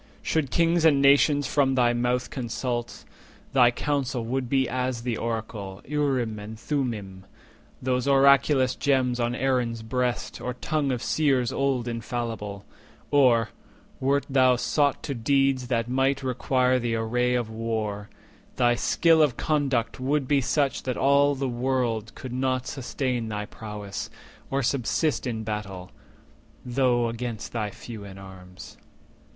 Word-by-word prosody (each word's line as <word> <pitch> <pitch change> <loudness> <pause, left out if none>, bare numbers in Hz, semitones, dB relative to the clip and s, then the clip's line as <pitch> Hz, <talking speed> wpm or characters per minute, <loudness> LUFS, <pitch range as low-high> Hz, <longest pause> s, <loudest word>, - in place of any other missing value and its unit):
Should 155 -4 0
kings 170 +3 +2
and 150 -4 +5
nations 140 +1 +4
from 135 -2 +2
thy 120 -2 +3
mouth 125 +1 -1
consult, 120 -1 -4 0.5
Thy 125 -3 +6
counsel 130 -2 -2
would 125 +1 -2
be 135 -1 +2
as 125 -1 -2
the 120 -2 -1
oracle 110 -4 -4
Urim 130 -7 0
and 110 +1 -8
Thummim, 110 -11 -3 0.6
those 125 0 0
oraculous 140 -1 +4
gems 130 -3 +1
On 120 0 0
Aaron's 125 -4 0
breast, 125 +1 -2
or 125 0 -4
tongue 145 +2 -1
of 125 -2 -3
Seers 135 -6 +1
old 135 -3 0
Infallible; 115 -4 -4 0.5
or, 125 -6 +4 0.5
wert 140 +2 +1
thou 130 -2 +4
sought 140 +3 +1
to 140 - -3
deeds 135 +1 +1
That 115 -2 0
might 135 +2 +1
require 130 0 +1
the 120 -1 -1
array 125 +2 0
of 120 -3 -2
war, 110 -2 -3 0.5
thy 120 -1 +3
skill 160 +6 +3
Of 140 -6 +2
conduct 135 -6 0
would 135 +1 0
be 140 -1 +3
such 140 +2 0
that 130 -1 -3
all 140 +1 +4
the 135 0 -2
world 120 -3 -1
Could 130 -2 -7
not 130 0 0
sustain 130 -3 -3
thy 105 -1 -3
prowess, 105 -2 -7 0.4
or 135 0 0
subsist 140 +4 0
In 110 -2 -3
battle, 100 -4 -5 0.7
though 125 -1 +2
against 115 -1 -5
thy 110 -3 -2
few 110 0 -9
in 100 -1 -10
arms. 95 -1 -12
125 Hz, 140 wpm, -26 LUFS, 115-135 Hz, 0.7 s, Thy